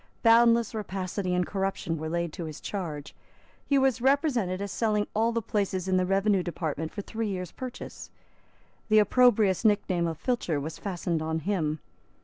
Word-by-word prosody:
Boundless 235 Hz, 0 st, +5 dB
rapacity 190 Hz, -3 st, -3 dB
and 180 Hz, 0 st, +1 dB
corruption 195 Hz, -4 st, -2 dB
were 160 Hz, 0 st, -4 dB
laid 170 Hz, -1 st, -2 dB
to 170 Hz, -, -5 dB
his 155 Hz, -2 st, -7 dB
charge. 160 Hz, -8 st, -5 dB, 0.5 s
He 280 Hz, -, +3 dB
was 265 Hz, -3 st, +2 dB
represented 255 Hz, -, +2 dB
as 200 Hz, -1 st, -4 dB
selling 210 Hz, -1 st, +1 dB
all 225 Hz, +2 st, +2 dB
the 230 Hz, -1 st, -2 dB
places 190 Hz, -3 st, -1 dB
in 185 Hz, 0 st, +2 dB
the 185 Hz, 0 st, +1 dB
revenue 195 Hz, 0 st, +2 dB
department 160 Hz, -3 st, -3 dB
for 205 Hz, -, -6 dB
three 225 Hz, +1 st, -3 dB
years' 180 Hz, -4 st, -4 dB
purchase. 255 Hz, -1 st, -8 dB, 0.8 s
The 215 Hz, -, +5 dB
opprobrious 215 Hz, -3 st, +4 dB
nickname 195 Hz, -5 st, +2 dB
of 165 Hz, -2 st, -4 dB
Filcher 180 Hz, -, -1 dB
was 155 Hz, +3 st, -6 dB
fastened 175 Hz, -4 st, -2 dB
on 160 Hz, 0 st, -2 dB
him. 160 Hz, -5 st, -1 dB
195 Hz, 165 wpm, -28 LUFS, 170-225 Hz, 0.8 s, Boundless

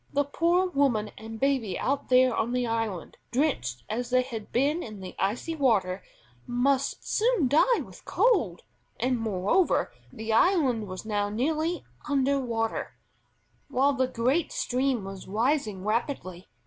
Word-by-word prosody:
The 285 Hz, -, +2 dB
poor 340 Hz, +6 st, +2 dB
woman 270 Hz, -, +1 dB
and 220 Hz, 0 st, -8 dB
baby 260 Hz, -8 st, +1 dB
out 275 Hz, +1 st, -1 dB
there 255 Hz, -1 st, +5 dB
on 235 Hz, +2 st, 0 dB
the 250 Hz, 0 st, +1 dB
island, 225 Hz, -6 st, -3 dB
drenched 185 Hz, -, -1 dB
as 240 Hz, +3 st, -3 dB
they 255 Hz, 0 st, +3 dB
had 230 Hz, -5 st, -7 dB
been 290 Hz, +7 st, +1 dB
in 215 Hz, -, -8 dB
the 185 Hz, -1 st, -8 dB
icy 230 Hz, +12 st, -1 dB
water, 205 Hz, -10 st, +1 dB, 0.5 s
must 260 Hz, +3 st, 0 dB
soon 450 Hz, -, +2 dB
die 320 Hz, -, +4 dB
with -, -, -14 dB
cold, 340 Hz, -, +1 dB, 0.4 s
and, 250 Hz, +1 st, +1 dB
moreover, 215 Hz, -, +1 dB, 0.2 s
the 220 Hz, 0 st, -3 dB
island 260 Hz, -, +3 dB
was 185 Hz, +2 st, -7 dB
now 205 Hz, -1 st, 0 dB
nearly 310 Hz, +10 st, -1 dB, 0.2 s
under 280 Hz, 0 st, +2 dB
water, 225 Hz, -3 st, -2 dB, 0.7 s
while 275 Hz, +1 st, +2 dB
the 260 Hz, -1 st, +1 dB
great 255 Hz, +6 st, 0 dB
stream 255 Hz, -3 st, 0 dB
was 195 Hz, -1 st, -8 dB
rising 220 Hz, -2 st, 0 dB
rapidly. 215 Hz, -5 st, -2 dB
250 Hz, 145 wpm, -27 LUFS, 215-280 Hz, 0.7 s, there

